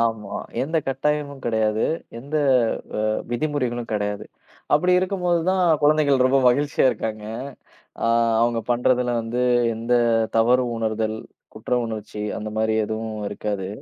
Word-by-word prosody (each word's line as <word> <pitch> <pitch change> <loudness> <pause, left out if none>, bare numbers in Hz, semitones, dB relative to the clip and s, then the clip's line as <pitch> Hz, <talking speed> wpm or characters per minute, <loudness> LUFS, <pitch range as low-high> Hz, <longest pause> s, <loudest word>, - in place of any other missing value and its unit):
ஆமா. 110 -3 -1 0.3
எந்த 160 +4 -1
கட்டாயமும் 140 +1 -1
கெடையாது, 110 -1 +1 0.3
எந்த 140 +5 -8 0.6
வ - - -1 0.3
விதிமுறைகளும் 120 -3 -2
கெடையாது. 105 -1 -2 0.5
அப்டி 180 +5 +4
இருக்கும்போது 180 -2 0
தான் 190 0 +2 0.2
குழந்தைகள் 145 -3 +4
ரொம்ப 135 +1 +4
மகிழ்ச்சியா 140 +4 +2
இருக்காங்க 110 -1 -4 0.8
அ, - - +2 0.4
அவங்க 115 0 +2
பண்றதுல 125 0 +1
வந்து 115 +2 -3 0.4
எந்த 115 +2 -1 0.4
தவறு 125 +3 +4
உணர்தல், 110 -1 -1 0.4
குற்ற 110 +3 -9
உணர்ச்சி, 105 -1 -6 0.2
அந்த 110 0 -5
மாதிரி 110 0 +1
எதுவும் 110 0 -4
இருக்காது. 100 -2 -3
120 Hz, 120 wpm, -23 LUFS, 110-140 Hz, 0.8 s, அப்டி